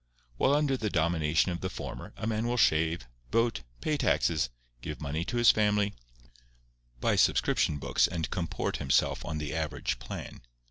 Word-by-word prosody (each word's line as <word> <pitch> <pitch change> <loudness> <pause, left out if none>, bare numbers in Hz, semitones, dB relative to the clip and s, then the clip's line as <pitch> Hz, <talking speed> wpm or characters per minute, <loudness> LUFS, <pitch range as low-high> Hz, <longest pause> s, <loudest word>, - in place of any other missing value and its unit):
While 140 - +3
under 145 -3 +2
the 110 -3 -1
domination 80 -1 +2
of 85 - -4
the 95 - -2
former - - -7
a 110 - -4
man 110 +1 -1
will 120 +1 0
shave, 80 - +2 0.2
vote, 115 - +1 0.2
pay 155 -1 0
taxes, 80 - +1 0.3
give - - -6
money 75 +4 -2
to 120 - -3
his 120 -1 +7
family, 105 -1 +2 1.1
buy - - +2
subscription 75 - +2
books - - +2
and 80 -2 -3
comport 85 -4 -2
himself 65 - +1
on 80 -2 -4
the 75 0 -4
average 80 -2 -2
plan. - - -7
85 Hz, 165 wpm, -29 LUFS, 80-115 Hz, 1.1 s, his